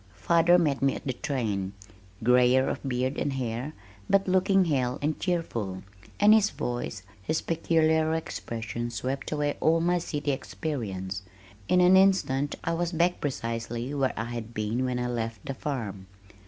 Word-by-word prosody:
Father 170 +1 +4
met 150 -6 +1
me 135 0 +2
at - - -8
the 130 - -1
train, 105 -8 -2 0.5
grayer 125 +2 +5
of - - -2
beard 130 0 -1
and 140 - -1
hair, 125 +2 -3 0.4
but 195 0 +3
looking 190 +1 +3
hale 130 -5 0
and 150 +1 -1
cheerful, 115 - -2 0.4
and 210 +1 +7
his 215 -1 +5
voice, 120 -5 -4 0.2
his 155 +11 -1
peculiar 160 -1 +2
expressions 120 -6 -4
swept 135 +4 -3
away 145 -1 -1
all 165 +1 +3
my 175 +1 +2
city 145 -3 -2
experience. 100 -10 -4 0.5
In 180 - +4
an 180 +1 +6
instant 185 -8 +3
I 165 - 0
was 170 +1 -1
back 175 +2 +1
precisely 115 -1 -3
where 135 -2 +1
I 115 - -1
had 115 -1 -6
been 110 +4 -1
when 125 -1 -1
I 125 - -1
left 115 -3 -4
the 135 - -3
farm. 110 -9 -4
135 Hz, 160 wpm, -27 LUFS, 115-165 Hz, 0.5 s, and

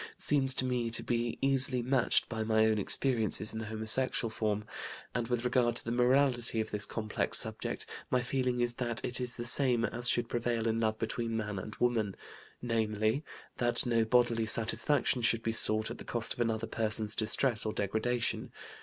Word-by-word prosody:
seems 135 -3 +2
to 130 - +1
me 125 -2 -1
to 115 - +1
be 120 -1 -2
easily 130 -2 +3
matched 130 -1 +2
by 115 -1 -4
my 110 0 +2
own 110 -1 +1
experiences 110 -1 0
in 110 - -5
the 110 - -6
homosexual 110 +2 0
form; 105 -1 -2 0.5
and, 120 -2 -2
with 120 0 -2
regard 125 -1 +1
to - - -4
the 115 - -3
morality 125 -1 +2
of 110 0 -3
this 105 -1 -2
complex 110 -2 -1
subject, - - 0 0.2
my 125 - +2
feeling 125 0 -1
is 120 0 +1
that 120 -1 -2
it 125 +1 -2
is 125 -1 -5
the 120 - -6
same 120 -2 +3
as 120 +1 +2
should 120 -1 +1
prevail 120 -1 -2
in 115 0 0
love 110 -1 0
between 115 0 -3
man 105 -3 -4
and 105 +3 -8
woman, 115 -5 0 0.5
namely: 110 +2 -1 0.3
that 120 -1 +3
no 115 -2 +2
bodily 115 -1 +1
satisfaction 125 +4 +1
should 115 0 +2
be 115 - -1
sought 110 -1 +1
at - - -8
the - - -8
cost 115 -2 -1
of - - -16
another 115 -1 -1
person's 110 -1 +2
distress 110 +1 +3
or 110 - -2
degradation. 110 +4 -2
115 Hz, 190 wpm, -31 LUFS, 110-125 Hz, 0.5 s, easily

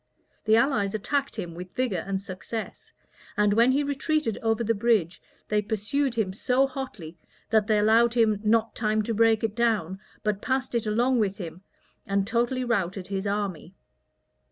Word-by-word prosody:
The 220 0 +5
allies 225 -5 +2
attacked 275 +6 -1
him 170 -1 -5
with 180 +2 -9
vigor 230 -10 -1
and 195 -1 -1
success; 195 +4 -7 0.5
and 210 0 +3
when 235 +4 +5
he 280 +2 +2
retreated 285 -3 -1
over 225 0 +1
the 230 +1 +1
bridge, 210 -6 +1 0.3
they 210 0 +1
pursued 220 +6 -1
him 205 -5 -1
so 250 +6 +2
hotly, 220 - -7 0.3
that 215 -2 +3
they 215 -2 +3
allowed 225 +3 +4
him 220 -3 +3
not 225 +1 +2
time 215 -1 0
to 230 - -2
break 225 0 +3
it 220 -2 0
down, 215 -6 0 0.2
but 210 -2 -1
passed 260 0 -1
it 230 -2 -1
along 240 +4 +2
with 200 -2 0
him, 175 -2 -7 0.5
and 195 0 +1
totally 240 +4 0
routed 195 -6 -1
his 195 0 -2
army. 195 -4 -3
220 Hz, 170 wpm, -26 LUFS, 200-235 Hz, 0.5 s, The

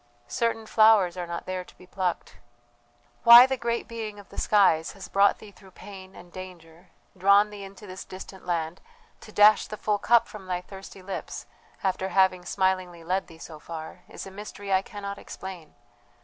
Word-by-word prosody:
"Certain 225 - -1
flowers 215 -5 +4
are 175 -1 -5
not 170 0 -5
there 185 -1 -4
to - - -20
be 180 - -16
plucked. 180 -1 -3 0.9
"Why 235 +1 +11
the 265 0 -1
great 235 -1 -2
Being 220 -3 -6
of 205 - -14
the - - -8
skies 190 -6 +3
has 195 - -10
brought 200 +1 +3
thee 210 - -13
through 195 0 -18
pain 190 -2 -11
and 175 0 -14
danger, 180 -2 -11 0.3
drawn 200 +3 +4
thee 205 -1 -9
into 195 +2 -11
this 185 -1 -8
distant 190 0 -11
land, 170 0 -2 0.4
to 215 - -13
dash 210 +1 +5
the 215 - -7
full 210 -1 -1
cup 235 +2 +4
from 205 -4 -11
thy 180 -1 -2
thirsty 190 0 -12
lips, 195 0 -6 0.4
after 190 0 -1
having 185 -2 +2
smilingly 185 -3 -1
led 185 +3 -1
thee 165 - -14
so 160 -1 -11
far 160 0 -8
is - - -8
a 195 - -10
mystery 205 0 -6
I 190 - +4
cannot 200 -1 -7
explain. 185 -5 -10
190 Hz, 185 wpm, -26 LUFS, 180-205 Hz, 0.9 s, Why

